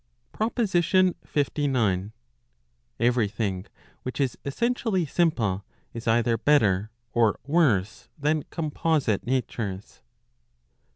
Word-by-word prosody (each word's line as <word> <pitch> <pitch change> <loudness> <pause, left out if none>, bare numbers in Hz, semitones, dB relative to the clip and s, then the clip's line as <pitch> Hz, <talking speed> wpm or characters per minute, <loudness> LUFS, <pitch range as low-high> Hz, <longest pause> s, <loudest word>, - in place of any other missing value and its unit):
PROPOSITION 190 -5 +2 0.2
LIX. 130 -10 +1 0.9
Every 120 -1 +3
thing 100 -2 -3 0.3
which 130 - -6
is 135 -3 +1
essentially 220 - 0
simple, 120 - +1 0.3
is 115 0 -7
either 115 0 +2
better 110 -8 +3 0.2
or 115 -3 +2
worse 135 - +1
than 150 +1 +1
composite 150 - 0
natures. 110 - -3
130 Hz, 90 wpm, -26 LUFS, 110-160 Hz, 0.9 s, Every